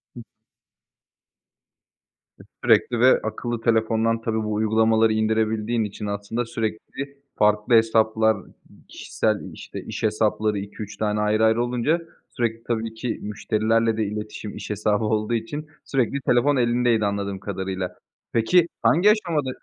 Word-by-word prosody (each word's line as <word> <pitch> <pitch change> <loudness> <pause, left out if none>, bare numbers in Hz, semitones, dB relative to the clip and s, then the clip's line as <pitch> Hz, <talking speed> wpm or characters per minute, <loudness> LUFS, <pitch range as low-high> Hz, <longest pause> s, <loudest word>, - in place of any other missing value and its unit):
Hıh. - - -9 2.2
E - - -12 0.2
sürekli 440 - +3
ve - - +5
akıllı 120 -1 -3
telefondan 115 0 +1
tabii 110 -1 -1
bu 105 0 -2
uygulamaları 110 +1 +3
indirebildiğin 110 +1 0
için 105 0 -6
aslında 105 +4 -3
sürekli 115 +5 -5 0.2
farklı 105 +2 +2
hesaplar, 110 -1 +3 0.5
kişisel - - -1 0.2
işte - - -8
iş - - -6
hesapları 110 -1 +1
2-3 100 +1 -8
tane 105 -1 0
ayrı 105 +1 +2
ayrı 110 +2 +3
olunca 125 +7 0 0.3
sürekli 115 -1 -2
tabii 115 -1 -2
ki 115 +1 -4
müşterilerle 110 +2 0
de 110 - +1
iletişim 105 0 -6
iş - - -7
hesabı 105 +1 0
olduğu 110 +1 0
için 145 +7 -3 0.2
sürekli 135 +1 0
telefon 130 +3 +3
elindeydi 120 -2 +2
anladığım 100 -1 -2
kadarıyla. 95 -2 -4 0.4
Peki 165 +10 +4
hangi 185 +6 +5
aşamada, 170 -10 0
110 Hz, 130 wpm, -23 LUFS, 105-120 Hz, 2.2 s, ve